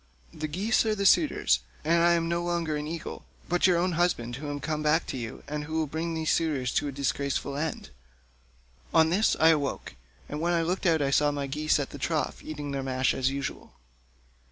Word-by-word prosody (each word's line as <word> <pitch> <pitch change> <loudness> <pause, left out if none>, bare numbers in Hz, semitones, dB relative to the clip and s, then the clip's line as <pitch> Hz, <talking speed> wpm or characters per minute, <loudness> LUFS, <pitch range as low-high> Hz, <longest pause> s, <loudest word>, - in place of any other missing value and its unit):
The 155 -1 -4
geese 195 +9 +1
are 215 - +1
the 200 -1 -2
suitors, 295 - +4 0.3
and 170 +2 +3
I 170 0 +5
am 165 -1 +1
no 170 +1 0
longer 170 -3 -1
an 150 0 -3
eagle, 165 0 -6 0.2
but 175 +1 +3
your 180 -2 +4
own 180 +2 +1
husband, 155 -9 0
who 145 +1 -6
am 145 0 -3
come 155 0 -2
back 155 +2 +2
to - - -5
you, 115 -2 -6
and 150 +1 -4
who 160 - -7
will 160 -1 +1
bring 160 +3 -3
these 160 -1 0
suitors 145 -7 0
to - - +1
a - - -3
disgraceful 140 0 -2
end.' 150 - -4 1.0
On 160 0 +5
this 205 +5 +3
I 160 +1 +7
woke, 145 -3 -3 0.3
and 150 +1 -5
when 175 +1 +1
I 165 -1 +2
looked 180 +2 -1
out 160 -3 +3
I 135 - 0
saw 145 +1 +4
my 145 -1 -2
geese 150 +3 +1
at 140 - -3
the 145 - -8
trough 155 0 -2
eating 145 -2 -5
their 140 -1 -2
mash 130 -1 +1
as 130 0 +1
usual." 140 0 -5
155 Hz, 220 wpm, -28 LUFS, 140-170 Hz, 1.0 s, I